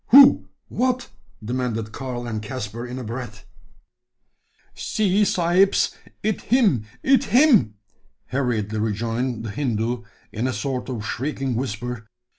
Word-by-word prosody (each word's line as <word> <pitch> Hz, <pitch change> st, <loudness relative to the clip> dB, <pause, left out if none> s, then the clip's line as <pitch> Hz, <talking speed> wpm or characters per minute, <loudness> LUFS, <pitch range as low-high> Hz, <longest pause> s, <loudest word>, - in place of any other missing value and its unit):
"Who? 275 Hz, +2 st, +8 dB, 0.2 s
What?" 255 Hz, 0 st, -1 dB, 0.4 s
demanded 115 Hz, -2 st, -2 dB
Karl 125 Hz, -2 st, -5 dB
and 110 Hz, -3 st, -3 dB
Caspar, 115 Hz, +1 st, -5 dB
in 125 Hz, +1 st, -6 dB
a 130 Hz, -, -5 dB
breath. 115 Hz, -2 st, -7 dB, 1.3 s
"See, 210 Hz, -1 st, +1 dB
sahibs! 185 Hz, +1 st, +3 dB, 0.3 s
it 215 Hz, -1 st, 0 dB
him 205 Hz, -, +3 dB, 0.2 s
it 270 Hz, 0 st, +4 dB
him!" 240 Hz, -, +5 dB, 0.5 s
hurriedly 110 Hz, -5 st, -1 dB
rejoined 115 Hz, +3 st, -1 dB
the 110 Hz, -, -4 dB
Hindoo, 120 Hz, -2 st, -1 dB, 0.3 s
in 115 Hz, +4 st, -1 dB
a 130 Hz, -, -1 dB
sort 135 Hz, -1 st, -3 dB
of 115 Hz, -4 st, -4 dB
shrieking 135 Hz, +4 st, -2 dB
whisper. 120 Hz, -1 st, -4 dB
125 Hz, 120 wpm, -23 LUFS, 110-170 Hz, 1.3 s, Who